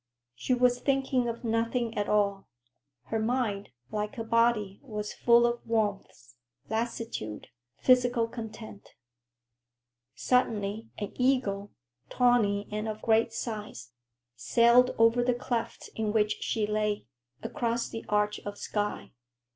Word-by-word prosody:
She 250 - 0
was 245 0 +3
thinking 265 -2 +1
of 235 +1 -6
nothing 230 +1 0
at 205 - -1
all. 200 -2 +1 0.6
Her 225 - -2
mind, 220 -3 -1 0.2
like 210 +3 -3
her 230 - -4
body, 225 -3 +2
was 210 -5 -5
full 235 0 +5
of 240 0 -1
warmth, 205 - -2 0.4
lassitude, 225 - -3 0.3
physical 245 -2 +3
content. 220 -2 -9 1.2
Suddenly 220 - 0
an 205 - -4
eagle, 250 -6 +1 0.4
tawny 220 -5 +2
and 215 +1 -3
of 215 0 -6
great 225 +1 +3
size, 210 - -6 0.4
sailed 235 - +5
over 230 +2 +4
the 245 0 +2
cleft 240 -1 -4
in 220 -1 -1
which 210 -1 +1
she 220 -2 0
lay, 210 0 -1 0.4
across 235 0 -1
the 225 - -7
arch 210 0 +1
of 205 0 -7
sky. 205 -1 -3
225 Hz, 125 wpm, -29 LUFS, 210-240 Hz, 1.2 s, full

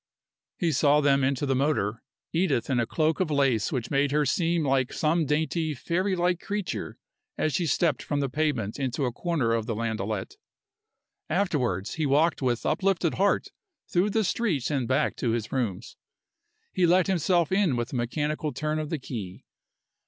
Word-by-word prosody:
He 170 -2 +1
saw 145 0 +4
them 140 -2 +3
into 135 +1 +1
the 135 - +1
motor, 130 -6 0 0.3
Edith 165 -7 +1
in 125 - +2
a 115 - 0
cloak 160 0 0
of 185 -4 +1
lace 135 -7 +1
which 125 -6 -3
made 140 0 +2
her 150 0 +2
seem 165 +4 +1
like 135 -2 +1
some 160 0 +1
dainty, 155 +1 0
fairylike 180 +3 0
creature 205 -2 -4 0.4
as 155 - 0
she 175 - 0
stepped 150 -1 +1
from 145 - -2
the 140 - 0
pavement 130 -6 -1
into 135 +1 -1
a 125 - -1
corner 140 -4 0
of 115 -1 -1
the 115 - -2
landaulette. 110 -3 -3 0.9
Afterwards, 135 - 0
he 155 -2 -1
walked 150 +4 +2
with 120 -3 0
uplifted 175 0 +1
heart 200 +1 +1 0.4
through 185 +4 +1
the 220 +2 +1
streets 180 - 0
and 135 -5 0
back 130 - +1
to 115 -2 0
his 115 -2 -3
rooms. 115 -9 -3 0.8
He 180 -2 +3
let 180 +1 +4
himself 175 -2 +1
in 190 -8 +2
with 120 +2 -3
a - - -2
mechanical 150 +5 -1
turn 155 0 -2
of 155 -1 -4
the 160 - -1
key. 110 -9 -7
145 Hz, 175 wpm, -27 LUFS, 125-170 Hz, 0.9 s, saw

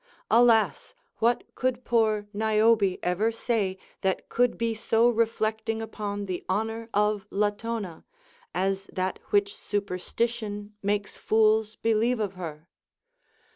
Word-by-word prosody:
Alas 230 - +4
I - - -38 0.2
what 235 +1 +2
could 255 -1 -1
poor 220 -3 +2
Niobe 215 -2 +3
ever 190 +6 +1
say 220 -4 -1 0.2
that 190 -1 -1
could 245 0 +2
be 230 -1 0
so 225 +1 +2
reflecting 225 -1 0
upon 205 -2 -4
the 185 -2 -4
honor 225 +3 -1
of 210 -1 +1
Latona, 205 -3 -2 0.5
as 195 +1 -1
that 185 0 -2
Avhich 200 0 +3
superstition 205 +2 -3
makes 205 0 -1
fools 220 0 +3
believe 225 +2 +1
of 205 -3 -1
her"? 165 -3 -7
215 Hz, 120 wpm, -27 LUFS, 200-225 Hz, 0.5 s, Alas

